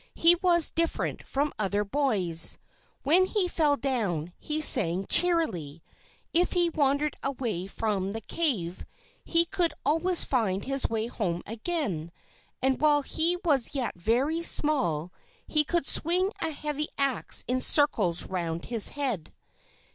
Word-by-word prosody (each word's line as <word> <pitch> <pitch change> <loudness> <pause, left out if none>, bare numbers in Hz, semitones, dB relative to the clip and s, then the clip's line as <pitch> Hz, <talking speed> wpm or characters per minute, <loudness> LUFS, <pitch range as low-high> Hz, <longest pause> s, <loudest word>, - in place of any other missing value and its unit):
He 335 +1 +6
was 345 -1 +3
different 335 0 -2
from 285 +2 -2
other 205 0 0
boys. 200 - +1 0.5
When 355 +7 +3
he 390 -2 0
fell 300 -4 +1
down, 200 - -2
he 305 0 -3
sang 190 - +5
cheerily; 185 - +1 0.5
if 350 +2 +1
he 345 -1 +1
wandered 285 0 0
away 235 -9 -4
from 195 -2 -3
the 225 +2 -6
cave, 200 - -2 0.4
he 335 0 +2
could 345 -3 -1
always 330 +5 +3
find 200 -7 -1
his 275 0 +1
way 225 -1 -2
home 180 -7 -4
again; 220 - -4 0.5
and 265 +1 0
while 295 -1 +3
he 335 +5 +1
was 285 -3 +1
yet 255 -4 -2
very 250 - -1
small, 215 - +1 0.3
he 305 -1 +1
could 335 -1 -1
swing 365 +4 +2
a 325 - 0
heavy 300 0 -4
axe 275 -2 +1
in 255 +1 -1
circles 215 - +3
round 170 -2 -4
his 230 -3 +2
head. 240 - -3
275 Hz, 140 wpm, -27 LUFS, 195-320 Hz, 0.5 s, He